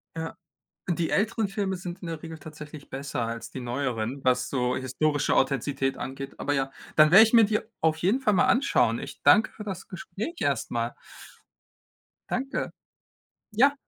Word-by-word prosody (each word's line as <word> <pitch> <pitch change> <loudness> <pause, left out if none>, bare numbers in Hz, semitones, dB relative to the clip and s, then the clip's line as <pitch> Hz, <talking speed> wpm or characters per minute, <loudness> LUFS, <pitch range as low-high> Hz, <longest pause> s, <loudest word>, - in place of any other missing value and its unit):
Ja. 160 0 -5 0.5
Die 170 -2 0
älteren 215 0 +1
Filme 195 -1 -2
sind 180 -1 -7
in 175 - -7
der 165 -2 -5
Regel 160 -1 -8
tatsächlich 150 -2 -11
besser 135 -2 -3
als 115 0 -4
die 130 - -6
neueren, 125 0 -3
was 125 -1 +2
so 125 -2 0
historische 145 +3 0
Authentizität 135 0 0
angeht. 135 +1 -6
Aber 145 - -1
ja, 135 -1 0 0.2
dann 155 0 +6
werde 205 +5 +10
ich 220 - -1
mir 230 -2 +8
die 210 +1 +1 0.2
auf 160 -1 +2
jeden 200 +11 +2
Fall 210 -6 +2
mal - - +4
anschauen. 270 +3 +3
Ich - - -8
danke 220 +1 +6
für 210 - -9
das 190 -4 -6
Gespräch 195 - -6
erst - - 0
mal. - - -2 1.4
Danke. 270 +2 -2 0.8
Ja, 270 +7 +4
160 Hz, 170 wpm, -27 LUFS, 135-200 Hz, 1.4 s, werde